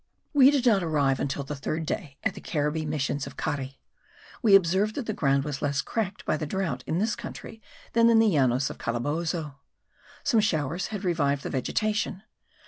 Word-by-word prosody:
We 275 -2 +7
did 280 -3 +1
not 215 -5 +5
arrive 145 -5 +1
until 140 0 -2
the 145 +2 -5
third 155 +4 -3
day 135 -2 -4
at 220 -4 0
the - - -10
Caribbee 150 0 -1
missions 145 -2 -2
of 140 - -11
Cari. 140 -3 -3 0.6
We 215 -6 +6
observed 195 +3 +3
that 275 - -3
the 215 - -2
ground 140 -5 +2
was 145 -2 -4
less 140 -1 0
cracked 210 -4 -3
by - - +1
the 155 - -4
drought 190 +2 -2
in 160 - 0
this 215 +4 +1
country 225 - -9 0.3
than 230 0 +5
in 230 - +5
the 225 - +5
Llanos 135 -3 +2
of - - -11
Calabozo. 145 +4 -2 0.6
Some 235 -5 +3
showers 170 -4 0
had 210 -2 -5
revived 145 -6 +1
the - - -4
vegetation. 210 - -1
160 Hz, 190 wpm, -27 LUFS, 140-210 Hz, 0.6 s, We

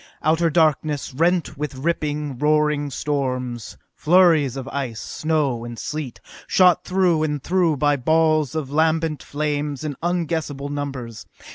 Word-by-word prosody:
Outer 165 +2 +3
darkness, 155 -3 +1
rent 170 +1 0
with 150 -2 -3
ripping, 150 -2 -2
roaring 150 -1 +2
storms, 125 - -3 0.2
flurries 160 -6 +4
of 135 -1 -6
ice, 130 -6 -4
snow 150 -7 -1
and 120 0 -7
sleet, 150 -3 -5 0.3
shot 180 -1 +4
through 180 -3 +2
and 150 -3 -2
through 175 -4 +1
by 145 +1 +2
balls 155 +1 +2
of 145 -4 -3
lambent 160 0 +1
flames 145 -1 -3
in 150 -2 -3
unguessable 160 -5 -2
numbers. 135 -6 -5
150 Hz, 130 wpm, -22 LUFS, 140-160 Hz, 0.3 s, flurries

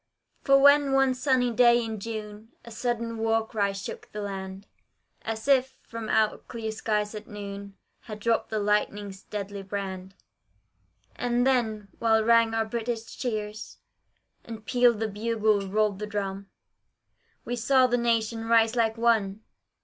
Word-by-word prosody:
For 275 0 +5
when 285 0 +5
one 270 -1 +4
sunny 255 -2 +1
day 235 0 +4
in 220 -1 -5
June, 215 0 -7
A 235 - -10
sudden 230 0 -3
war 225 0 +1
cry 205 -3 -1
shook 195 0 -8
the 210 - -5
land, 195 0 -6 0.6
As 220 +2 -5
if 265 -1 +3
from 230 -1 -7
out 215 -1 +1
clear 225 -2 -4
skies 210 -1 -1
at 215 0 -8
noon 200 -2 -8 0.2
Had 215 -2 -9
dropped 230 +2 0
the 220 - -2
lightning's 205 -1 -1
deadly 200 -1 -6
brand 190 -1 -6 1.0
Ah 245 - -1
then, 240 -4 +1
while 220 -1 +3
rang 230 0 +4
our 225 0 +1
British 230 0 -4
cheers, 215 -4 -4 0.7
And 220 -2 -9
pealed 245 -1 +3
the 220 - 0
bugle, 215 -1 0
rolled 210 0 0
the 210 - -4
drum, 200 -1 -4 1.0
We 245 - -2
saw 255 +2 +4
the 245 -1 +1
Nation 230 -1 0
rise 225 0 +4
like 225 -1 +1
one! 220 -3 +1
220 Hz, 150 wpm, -27 LUFS, 210-235 Hz, 1.0 s, For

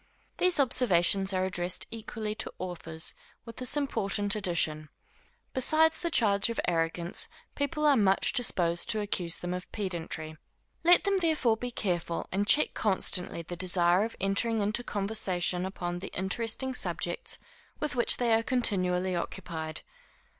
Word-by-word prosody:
These 360 -3 +4
observations 195 -7 +3
are 185 -1 0
addressed 180 -1 -2
equally 220 -1 -5
to - - -5
authors, 165 -3 -3 0.3
with 230 -1 -11
this 255 +3 +4
important 205 -7 -1
addition. 160 -6 -1 0.6
Besides 315 +5 +3
the 340 - -1
charge 210 -8 +4
of 230 - -3
arrogance, 170 0 0 0.3
people 300 +2 -2
are 290 -2 +5
much 195 -5 +2
disposed 175 -9 0
to 220 - +4
accuse 180 -5 +1
them 175 0 -4
of 180 +1 -7
pedantry. 165 -5 -4 0.5
Let 350 +1 +6
them 400 -1 +1
therefore 315 -10 +2
be 245 +2 -5
careful, 175 -7 -3
and 200 +2 -1
check 300 - +4
constantly 185 -4 +2
the 175 +2 -7
desire 180 +1 +3
of 230 - -5
entering 200 +4 +1
into 210 +3 -1
conversation 190 -4 -1
upon 175 -2 -5
the 190 - -7
interesting 225 +7 -2
subjects 470 - -3 0.4
with 300 -3 -3
which 240 - +3
they 240 -2 +1
are 225 - +4
continually 185 -7 0
occupied. 165 -3 -5
200 Hz, 145 wpm, -29 LUFS, 175-235 Hz, 0.6 s, Let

